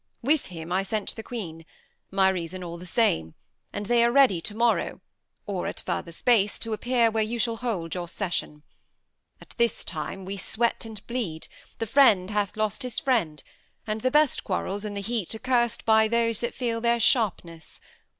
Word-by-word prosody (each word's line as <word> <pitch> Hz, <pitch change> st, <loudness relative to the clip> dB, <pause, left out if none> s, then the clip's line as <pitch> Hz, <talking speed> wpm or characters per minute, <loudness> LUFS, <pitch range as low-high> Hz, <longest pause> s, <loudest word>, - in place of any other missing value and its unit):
With 295 Hz, +3 st, +2 dB
him 165 Hz, -1 st, -8 dB
I 185 Hz, +2 st, +2 dB
sent 205 Hz, +1 st, -3 dB
the 225 Hz, -, -6 dB
Queen, 180 Hz, -9 st, -6 dB, 0.5 s
My 190 Hz, 0 st, +4 dB
reason 185 Hz, 0 st, -4 dB
all 170 Hz, -1 st, -6 dB
the 180 Hz, -, -10 dB
same; 80 Hz, -, +1 dB, 0.4 s
and 205 Hz, -, -4 dB
they 235 Hz, +2 st, +4 dB
are 235 Hz, -, +4 dB
ready 255 Hz, -10 st, +5 dB
To 210 Hz, -, -6 dB
morrow, 235 Hz, +1 st, +1 dB, 0.5 s
or 195 Hz, -3 st, -2 dB
at -, -, -5 dB
further 170 Hz, -, -3 dB
space, 210 Hz, +3 st, +2 dB
t' 225 Hz, -1 st, -3 dB
appear 235 Hz, +1 st, +2 dB
Where 220 Hz, 0 st, +1 dB
you 220 Hz, +2 st, -1 dB
shall 230 Hz, 0 st, 0 dB
hold 205 Hz, -9 st, -3 dB
your 175 Hz, -1 st, -4 dB
session. 170 Hz, -5 st, -3 dB, 0.8 s
At -, -, -16 dB
this 235 Hz, -2 st, +1 dB
time 180 Hz, +4 st, -5 dB
We 195 Hz, +1 st, -4 dB
sweat 230 Hz, +5 st, 0 dB
and 220 Hz, -2 st, -9 dB
bleed: 215 Hz, -11 st, -3 dB, 0.3 s
the 225 Hz, -, -2 dB
friend 215 Hz, -6 st, +5 dB
hath 205 Hz, 0 st, -1 dB
lost 215 Hz, +2 st, -1 dB
his 250 Hz, -3 st, -4 dB
friend; 205 Hz, -, 0 dB, 0.4 s
And 215 Hz, 0 st, -3 dB
the 255 Hz, -, +2 dB
best 300 Hz, +1 st, +3 dB
quarrels, 200 Hz, +2 st, -2 dB
in 205 Hz, -1 st, -4 dB
the 200 Hz, -, -3 dB
heat, 220 Hz, -1 st, -2 dB
are -, -, -4 dB
curs'd 240 Hz, 0 st, 0 dB
By 220 Hz, 0 st, +5 dB
those 230 Hz, -1 st, +1 dB
that 235 Hz, -, -3 dB
feel 230 Hz, -3 st, -2 dB
their 235 Hz, 0 st, +2 dB
sharpness. 180 Hz, -, 0 dB
215 Hz, 190 wpm, -26 LUFS, 185-235 Hz, 0.8 s, ready